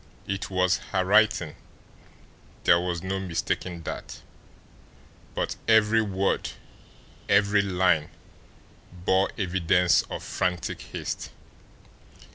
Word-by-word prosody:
It 100 Hz, 0 st, -3 dB
was 90 Hz, -1 st, +2 dB, 0.2 s
her 95 Hz, -1 st, +2 dB
writing; 100 Hz, -5 st, +3 dB, 1.1 s
there 85 Hz, -, +5 dB
was 90 Hz, -1 st, -3 dB
no 95 Hz, +1 st, -2 dB
mistaking 90 Hz, -1 st, -3 dB
that, -, -, -7 dB, 1.1 s
but -, -, -2 dB
every 110 Hz, 0 st, +5 dB
word, 100 Hz, -2 st, 0 dB, 0.8 s
every 100 Hz, 0 st, +4 dB
line 90 Hz, -5 st, +1 dB, 0.8 s
bore 95 Hz, +2 st, +1 dB
evidence 90 Hz, -2 st, +3 dB
of -, -, -5 dB
frantic 90 Hz, -2 st, -2 dB
haste. -, -, -5 dB
95 Hz, 90 wpm, -26 LUFS, 90-100 Hz, 1.1 s, there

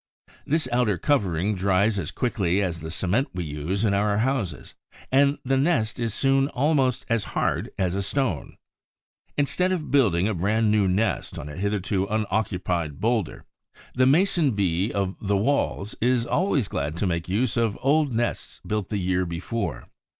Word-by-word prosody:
This 155 Hz, +2 st, +1 dB
outer 120 Hz, -5 st, +2 dB
covering 100 Hz, -, +1 dB
dries 100 Hz, +2 st, +2 dB
as 75 Hz, -, -3 dB
quickly 100 Hz, -7 st, 0 dB
as 90 Hz, -4 st, -1 dB
the 80 Hz, 0 st, -7 dB
cement 95 Hz, -, 0 dB
we 90 Hz, -, -2 dB
use 80 Hz, +7 st, -2 dB
in 100 Hz, -, +2 dB
our 100 Hz, +1 st, +1 dB
houses; 110 Hz, -, -2 dB, 0.4 s
and 140 Hz, +2 st, +4 dB
the 135 Hz, +1 st, +2 dB
nest 130 Hz, -7 st, +1 dB
is 115 Hz, -1 st, -1 dB
soon 135 Hz, +4 st, +2 dB
almost 135 Hz, -2 st, +1 dB
as 115 Hz, -3 st, +1 dB
hard -, -, 0 dB
as 90 Hz, -2 st, 0 dB
a 100 Hz, -, -1 dB
stone. 115 Hz, -, -2 dB, 0.8 s
Instead 180 Hz, +6 st, +1 dB
of 170 Hz, -5 st, -2 dB
building 100 Hz, -10 st, +3 dB
a 110 Hz, -, 0 dB
brand 105 Hz, +4 st, +1 dB
new 105 Hz, -2 st, +3 dB
nest 95 Hz, +3 st, 0 dB
on 75 Hz, -, -6 dB
a 75 Hz, -, -8 dB
hitherto 100 Hz, 0 st, -1 dB
unoccupied 90 Hz, -7 st, -1 dB
bowlder, 115 Hz, -4 st, -1 dB, 0.5 s
the 130 Hz, 0 st, +3 dB
Mason 160 Hz, -, +3 dB
bee 95 Hz, +1 st, 0 dB
of 95 Hz, -1 st, -1 dB
the 100 Hz, -1 st, +1 dB
Walls 110 Hz, -3 st, 0 dB
is 120 Hz, 0 st, +2 dB
always 145 Hz, -, +1 dB
glad 75 Hz, -3 st, -3 dB
to 100 Hz, -, -1 dB
make 85 Hz, -1 st, -2 dB
use 115 Hz, +7 st, 0 dB
of 115 Hz, -3 st, 0 dB
old 145 Hz, +1 st, +2 dB
nests 120 Hz, +1 st, -2 dB
built 105 Hz, -3 st, -2 dB
the 105 Hz, -, -1 dB
year 95 Hz, -1 st, 0 dB
before. 85 Hz, -, -4 dB
105 Hz, 165 wpm, -25 LUFS, 95-130 Hz, 0.8 s, and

